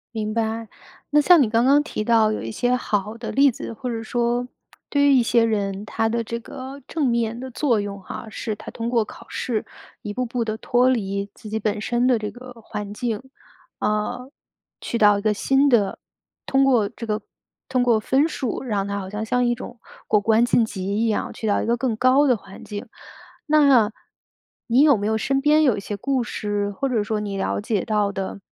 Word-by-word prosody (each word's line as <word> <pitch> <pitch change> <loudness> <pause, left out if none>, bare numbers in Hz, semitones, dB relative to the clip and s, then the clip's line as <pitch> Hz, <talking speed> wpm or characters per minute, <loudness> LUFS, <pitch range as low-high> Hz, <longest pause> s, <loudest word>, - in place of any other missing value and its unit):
明 215 -1 -2
白。 225 0 -2 0.4
那 295 0 +5
像 345 +1 +6
你 240 - +2
刚 230 +1 +2
刚 280 +2 +5
提 215 - -4
到 220 -1 +4
有 215 - -3
一 115 - -5
些 245 - +1
好 210 -3 -2
的 230 - -5
例 280 +1 +5
子， 230 - -7
或 250 +3 -5
者 225 -1 -3
说 240 +2 0 0.4
对 285 -1 +2
于 280 - +6
一 255 -3 +5
些 235 0 +3
人， 200 -2 -1
它 225 +1 -1
的 235 +1 0
这 230 +1 -4
个 260 +4 -9
正 310 -4 0
面 235 -1 0
的 260 +1 -6
作 245 -3 +1
用 200 -1 -5
哈， 190 - -8
是 215 +1 -4
他 - - -10
通 230 0 -4
过 235 -3 +2
考 - - -12
试， 230 -4 -2 0.4
一 210 -4 -5
步 255 +3 -1
步 240 0 -2
地 220 -1 -3
脱 245 +2 +2
离 200 -5 -1
自 - - -12
己 220 +1 -2
本 210 0 -1
身 240 +3 0
的 250 -3 +3
这 210 -1 -3
个 250 +1 -11
环 210 -1 -6
境， 225 -1 -3 0.6
啊， 215 +4 -1 0.5
去 235 - -2
到 205 -2 +5
一 - - -3
个 215 0 +2
新 270 +8 +2
的 210 -6 +2 0.5
通 270 0 +3
过 235 -7 +3
这 230 - -8
个 215 0 -1 0.5
通 255 -1 +1
过 240 -2 +4
分 265 +7 +2
数 270 -7 -3
让 205 -6 -1
他 200 0 -3
好 190 -1 -6
像 210 +2 -4
像 245 +2 +1
一 240 0 +1
种 240 +1 -9 0.3
过 210 - +4
关 220 +3 +3
晋 240 -1 +3
级 190 -4 -6 0.2
一 - - +2
样， 215 - -1
去 220 - -4
到 205 - +2
一 - - -2
个 235 +1 +1
更 240 -2 -1
高 255 +5 +4
的 250 - +4
环 195 -2 -12
境。 205 -1 -6 0.6
那 280 -8 +5 0.8
你 245 +3 +4
有 295 -3 +6
没 205 - -3
有 220 0 +1
身 270 +5 0
边 300 +2 +4
有 255 -7 +4
一 - - -2
些 205 - -5
故 260 +4 0
事， 205 -3 -2
或 275 +7 -2
者 235 -4 +1
说 215 0 -2
你 205 -1 -4
了 190 - -1
解 205 -2 -1
到 210 -2 0
的， 195 +1 -4
230 Hz, 235 characters per minute, -23 LUFS, 210-250 Hz, 0.8 s, 像